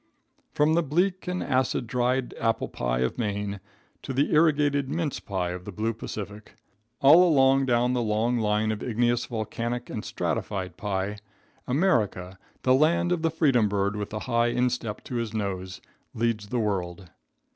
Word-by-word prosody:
From 150 +2 +2
the 170 - +3
bleak 180 +5 0
and 180 0 -2
acid 130 -2 0
dried 125 +1 0
apple 115 -1 0
pie - - -2
of 65 - -1
Maine 100 -2 -2 0.4
to 135 - -5
the 140 +3 +1
irrigated 145 -3 +3
mince 160 -2 -2
pie 95 -4 -3
of 90 0 -6
the 105 - -7
blue 110 +4 -2
Pacific, 105 -1 -8 0.5
all 150 +6 +8
along 135 -5 +4
down 125 0 +2
the 125 - +1
long 115 +2 +1
line 105 0 +1
of 110 - -4
igneous, 120 0 0
volcanic 115 +2 -4
and 105 - -4
stratified 95 -3 -3
pie, 100 0 -3 0.5
America, 110 - 0 0.2
the 130 - +4
land 160 +5 +3
of 175 -2 +1
the 165 - +2
freedom 135 -9 +2
bird 100 0 0
with 105 -1 -4
the 110 0 -5
high 120 -2 +1
instep 120 -2 -1
to 125 - -4
his 115 -2 -3
nose, 95 -3 -4 0.3
leads 115 -2 -1
the 125 - -2
world. 95 -4 -3
115 Hz, 165 wpm, -26 LUFS, 105-135 Hz, 0.5 s, all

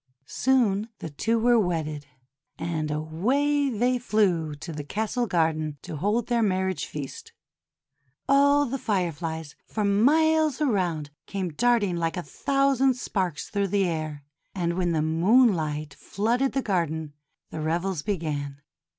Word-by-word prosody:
Soon 230 - +1
the 160 - -7
two 225 +11 0
were 240 +1 +4
wedded, 155 -6 -2 0.5
and 155 -2 -2
away 250 - +1
they 245 +2 +1
flew 180 -10 +1
to 160 +3 -8
the 150 -1 -5
castle 220 - -2
garden 160 -4 0
to - - -6
hold 210 +7 0
their 240 -1 +1
marriage 190 -3 0
feast. 140 -3 -7 0.9
All 285 +1 +5
the 270 +1 -3
Fireflies 165 - -2
for 215 -1 -2
miles 305 +8 +3
around 180 - 0 0.2
came 190 -3 -3
darting 205 0 +1
like 165 +1 -1
a 180 - -3
thousand 275 0 +2
sparks 185 -9 -2
through 200 -1 0
the 195 0 +1
air. 155 -4 -3 0.3
And 170 -2 -1
when 175 -1 0
the 155 -2 +1
moonlight 160 - +2
flooded 235 - -1
the 270 - 0
garden, 160 -6 -1 0.4
the 155 - -5
revels 170 +2 -1
began. 150 -7 -3
190 Hz, 135 wpm, -26 LUFS, 160-240 Hz, 0.9 s, All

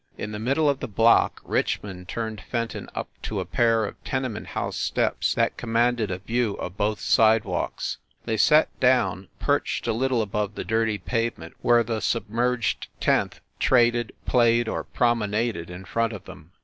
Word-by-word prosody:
In 105 - -5
the 105 - -5
middle 135 +7 +1
of 140 -2 +2
the - - -4
block 115 +2 +3
Richmond 90 -3 -2
turned 110 -2 -4
Fenton 115 -2 -4
up - - -3
to 105 - -3
a 95 - -3
pair 115 +4 +2
of - - -9
tenement 130 -5 -3
house - - -3
steps - - 0
that - - +1
commanded 115 -1 +1
a 90 - -2
view 110 +2 -1
of 90 - -6
both 105 +1 0
sidewalks. 110 -1 +1 0.3
They 110 - 0
sat 150 +7 +5
down, 100 -8 +2
perched - - 0
a - - +1
little 125 0 +1
above 105 0 -2
the - - -4
dirty 110 -1 +1
pavement 115 -5 -3
where 120 -1 +4
the 115 -1 -2
submerged 115 0 -1
tenth - - +1 0.2
traded, 120 -2 +3
played 120 -1 +3
or - - -3
promenaded 110 -6 0
in 90 +2 -9
front 115 +4 0
of 100 -3 -9
them. 90 -4 -12
115 Hz, 165 wpm, -25 LUFS, 105-120 Hz, 0.3 s, sat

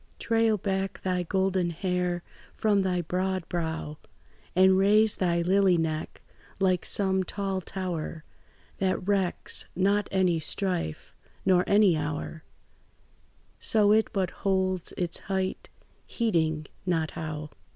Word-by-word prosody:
Trail 225 -1 +2
back 195 0 -2
thy 185 -1 0
golden 190 0 0
hair 180 0 -1 0.3
from 205 -2 +2
thy 180 -2 0
broad 185 +1 -2
brow, 160 -3 -3 0.6
And 190 +1 +6
raise 210 +3 +4
thy 170 -2 +1
lily 190 0 +4
neck 155 -1 -3 0.4
like 185 -2 +2
some 190 -1 +2
tall 195 0 -3
tower, 170 -4 -5 0.6
That 185 -1 -1
recks 195 -3 +1
not 200 +3 +1
any 185 -3 +2
strife 175 - -3 0.3
nor 180 -1 +4
any 200 -4 +5
hour, 155 +1 -4 1.2
So 210 -2 +3
it 220 +1 +4
but 190 -3 -1
holds 190 -2 0
its 175 -2 -3
height, 190 -1 -3 0.4
heeding 160 -9 0 0.2
not 165 -3 0
how. 155 -2 -6
185 Hz, 120 wpm, -27 LUFS, 170-195 Hz, 1.2 s, And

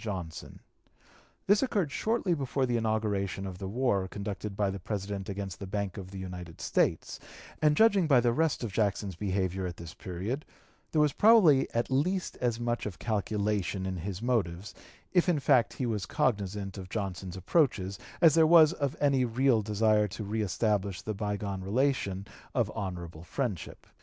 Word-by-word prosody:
Johnson. 90 -7 -6 0.8
This 205 +1 +4
occurred 205 - 0
shortly 220 0 0
before 135 -3 -1
the 120 -1 -1
inauguration 105 -4 -1
of 90 -2 -7
the 95 - -4
war 100 -3 0
conducted 100 0 -5
by 100 -2 +1
the 100 - -5
President 100 0 -4
against 100 -2 -5
the 100 - -6
Bank 100 -1 -3
of 95 -2 -7
the 95 - -9
United 90 -3 -7
States; - - 0 0.4
and 150 -1 +4
judging 200 -6 +5
by 135 -5 +6
the 120 0 +2
rest 160 -1 +1
of 110 -5 -4
Jackson's 100 -3 0
behavior 95 0 -1
at 85 - -7
this 85 -1 -9
period, 105 - -4 0.5
there 155 - +3
was 150 - +1
probably 200 -11 +6
at 115 +3 0
least 180 +8 0
as 120 -2 0
much 120 -2 -1
of 95 -6 -7
calculation 105 -2 -1
in 95 -1 -3
his 95 +4 -5
motives, 100 -6 -1 0.4
if 180 0 +4
in 165 -4 +2
fact 135 -4 +3
he 130 - -3
was 110 -4 -2
cognizant 100 - -1
of 95 -1 -9
Johnson's 95 -3 -4
approaches, 100 - +1 0.2
as 165 -4 +7
there 160 0 +5
was 165 -1 +7
of 140 -3 -2
any 140 -3 +3
real 125 0 +2
desire 105 0 +2
to 105 +2 -6
reëstablish 105 -2 -1
the 110 - -3
bygone 100 -1 -3
relation 100 -2 0 0.3
of 115 -4 +1
honorable 85 -6 -5
friendship. 95 - -4
105 Hz, 170 wpm, -29 LUFS, 95-130 Hz, 0.8 s, as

